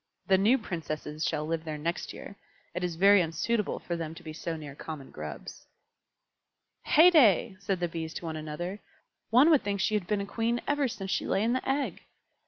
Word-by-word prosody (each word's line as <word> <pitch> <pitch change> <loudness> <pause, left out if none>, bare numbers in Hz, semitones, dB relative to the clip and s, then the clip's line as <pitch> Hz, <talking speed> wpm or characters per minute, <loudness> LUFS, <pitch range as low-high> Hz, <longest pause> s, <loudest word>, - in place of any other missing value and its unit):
The 190 - +4
new 225 +7 +4
Princesses 155 - -5
shall 150 - -1
live 160 0 -2
there 155 -2 -4
next 165 +4 -3
year; 200 - -10 0.4
it 180 +1 -3
is 175 -2 -2
very 200 +3 +6
unsuitable 190 +7 -1
for 175 - -4
them 165 -1 -5
to - - -12
be 155 - -7
so 165 +1 -4
near 150 -3 -8
common 150 -1 -8
Grubs." 75 -2 -8 1.2
"Heyday!" 300 - +6
said 195 -2 -2
the 175 - 0
Bees 160 -1 -5
to - - -6
one 160 -1 -4
another. 155 +6 -5 0.5
"One 255 +8 +6
would 300 - +5
think 200 -1 -2
she 205 - +1
had 205 -5 0
been 210 -1 0
a - - -3
Queen 230 +3 -1
ever 290 -1 +2
since 195 -5 -5
she - - -1
lay 195 - +1
in 235 +2 +2
the 255 - -2
egg." 275 +1 -1
180 Hz, 200 wpm, -29 LUFS, 160-215 Hz, 1.2 s, very